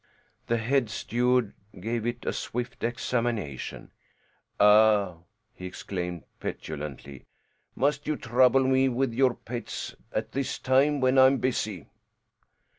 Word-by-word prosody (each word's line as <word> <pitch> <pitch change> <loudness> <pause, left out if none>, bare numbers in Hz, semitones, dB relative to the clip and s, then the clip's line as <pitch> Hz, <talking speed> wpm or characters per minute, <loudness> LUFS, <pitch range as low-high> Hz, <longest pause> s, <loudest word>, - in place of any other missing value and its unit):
The 115 - +1
head 120 +1 +1
steward 120 0 0 0.3
gave 115 +4 -2
it 120 0 -4
a - - -1
swift 125 +1 -5
examination. 115 - -2 0.7
"Ah!" 105 -3 +5 0.4
he 90 - -8
exclaimed 90 -2 -5 0.2
petulantly. 70 -3 -7 0.5
"Must 140 +2 0
you 155 - +1
trouble 125 +2 +4
me 130 0 +3
with 130 -1 0
your 130 0 +3
pets 120 +1 -6 0.2
at 110 - -3
this 135 0 -2
time 135 +2 +2
when 130 +1 +4
I 130 - +9
am 135 +1 +3
busy?" 110 - -2
120 Hz, 120 wpm, -27 LUFS, 105-130 Hz, 0.7 s, I